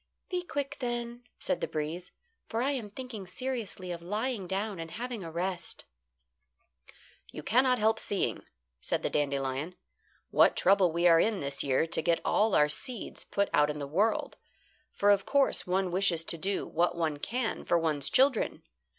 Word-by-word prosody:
"Be 360 -1 0
quick 285 -4 -4
then," 240 -1 -4
said 275 - -2
the - - 0
breeze, 160 +4 -4 0.4
"for 230 +1 -1
I 275 - +1
am 245 -7 -3
thinking 220 -3 -8
seriously 225 -5 -4
of 170 -1 -5
lying 210 +3 -2
down 195 +1 -2
and 165 0 -5
having 235 +1 -5
a 165 - -6
rest." 175 +1 -3 1.5
"You - - -8
cannot 255 +2 +3
help 220 0 +2
seeing," 200 - -1 0.4
said - - -2
the - - -1
dandelion, 140 +3 -1 0.6
"what - - +5
trouble 190 -2 +4
we 170 +2 0
are 165 -1 +7
in 210 +2 +2
this 140 -1 0
year 135 +2 +2
to 165 - -1
get 165 +1 +2
all 215 -1 +3
our 150 - +5
seeds 240 - -4
put 200 0 0
out 150 0 +4
in 150 - -3
the 145 - -4
world; 195 +11 0 0.5
for, 205 0 +3
of 200 -1 +2
course, 280 -7 +2
one 185 0 +1
wishes 180 -3 +2
to 170 - -1
do 195 +4 -1
what 175 +2 +1
one 160 -3 0
can 235 - -2
for 170 - +2
one's 150 -4 +1
children. 265 -3 +2
195 Hz, 175 wpm, -30 LUFS, 165-235 Hz, 1.5 s, are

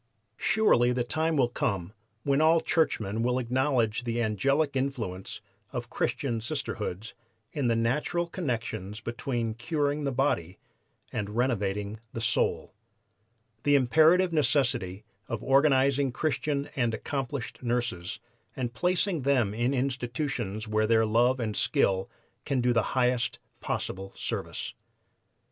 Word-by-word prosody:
Surely 180 - +4
the 125 0 0
time 160 +5 0
will 130 -3 +4
come 100 -5 -2 0.3
when 140 +1 +2
all 160 +1 +5
churchmen 115 - 0
will 125 +1 +1
acknowledge 125 -2 +1
the 120 0 -2
angelic 135 +7 +1
influence 120 -9 -3 0.3
of - - -5
Christian 120 -5 -1
Sisterhoods 110 -2 -3 0.4
in 140 -4 -1
the 115 - +3
natural 145 +9 0
connections 115 - -3
between 120 -1 -2
curing 145 +4 -1
the 140 - 0
body 100 - 0 0.6
and 105 +1 -3
renovating 105 -4 0
the - - -4
soul, 115 -1 0 0.9
the 145 +2 +4
imperative 160 +7 +5
necessity 125 - +1 0.2
of 115 - -4
organizing 135 -1 +4
Christian 145 0 -1
and 120 -4 +1
accomplished 135 -2 -4
nurses 120 -7 -2 0.4
and 120 -2 -3
placing 180 - +1
them 125 -6 +2
in 120 +4 +1
institutions 125 -4 -2
where 110 0 +1
their 110 0 +4
love 120 +4 +3
and 110 -3 -2
skill 95 -1 +1 0.3
can 135 - 0
do 125 0 +2
the 115 +2 0
highest 125 -1 +2 0.2
possible 95 0 -4
service." - - -4
125 Hz, 125 wpm, -28 LUFS, 110-140 Hz, 0.9 s, all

